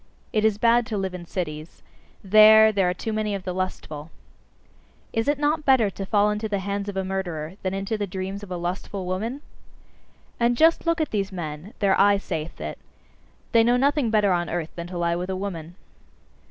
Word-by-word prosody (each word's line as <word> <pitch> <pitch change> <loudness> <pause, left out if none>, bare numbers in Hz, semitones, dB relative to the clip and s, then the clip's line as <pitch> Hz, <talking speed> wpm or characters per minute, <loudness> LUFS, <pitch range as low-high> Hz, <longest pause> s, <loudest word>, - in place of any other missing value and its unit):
It 215 - +2
is 220 -2 +3
bad 235 +1 +3
to 215 - -3
live 190 -1 -2
in 175 -1 -8
cities: 155 -3 -5 0.4
there, 215 +2 +7
there 195 -3 +2
are - - 0
too 220 +4 -4
many 215 -1 -1
of 195 - -6
the 185 - -3
lustful. 165 -4 -5 1.0
Is 225 +2 0
it 290 0 +2
not 300 +2 0
better 255 -8 +4
to 195 0 -6
fall 210 0 +3
into 210 +1 -3
the 205 - 0
hands 200 +1 -3
of 195 - -5
a 190 - 0
murderer, 175 -4 -4
than 190 0 -2
into 195 +3 -3
the 205 - -1
dreams 190 +2 -5
of 205 - -10
a 180 - -3
lustful 180 +2 -4
woman? 220 +10 -3 1.0
And 235 0 +2
just 325 +3 +4
look 335 0 +2
at 310 - -2
these 200 -2 -1
men: 165 +1 -7
their 195 -1 +3
eye 200 0 +5
saith 165 -5 -5
it - - -6 0.7
they 230 -1 +5
know 240 +2 +3
nothing 280 -1 +2
better 210 -3 +3
on 175 -1 0
earth 165 -1 -3
than 170 0 -6
to 180 0 -6
lie 170 0 +1
with 180 +2 -4
a 190 - -1
woman. 175 -4 -5
195 Hz, 205 wpm, -24 LUFS, 180-220 Hz, 1.0 s, there